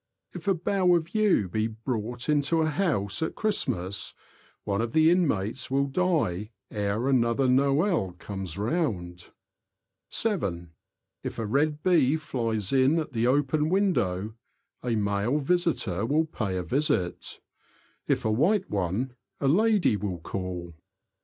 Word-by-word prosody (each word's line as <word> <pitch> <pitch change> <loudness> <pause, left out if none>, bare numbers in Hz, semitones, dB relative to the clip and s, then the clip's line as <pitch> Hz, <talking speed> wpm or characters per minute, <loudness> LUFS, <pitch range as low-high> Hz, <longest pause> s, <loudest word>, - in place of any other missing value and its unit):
If - - -8
a 195 - +4
bough 180 +1 +2
of 170 +1 -2
yew 210 - +3
be 110 +4 -1
brought 115 +1 -4
into 150 +2 +2
a 155 - 0
house 145 - 0
at 160 - -2
Christmas, 120 - -1 0.5
one 100 +1 -1
of 115 0 -3
the 160 +1 +5
inmates 125 - 0
will 135 +1 +2
die 140 - 0 0.2
ere 105 +3 -1
another 130 0 +2
Noel 140 - +2
comes 95 -1 -6
round. 100 - -2 0.8
(7.) 95 - -1 0.5
If - - -5
a 115 - -2
red 150 +6 0
bee 160 -5 +4
flies 115 -8 -2
in 135 +4 +4
at 155 -2 -2
the 120 -1 +1
open 145 +3 +2
window, 110 - +1 0.5
a 120 -2 -1
male 100 +5 0
visitor 150 - 0
will 155 +5 +2
pay 105 -11 -3
a 90 - -2
visit; 95 -8 -1 0.7
if - - 0
a 110 - +2
white 180 - +2
one, 100 +7 -1 0.3
a 140 - 0
lady 205 - +3
will 95 -3 -3
call. 90 0 -5
125 Hz, 140 wpm, -27 LUFS, 100-160 Hz, 0.8 s, the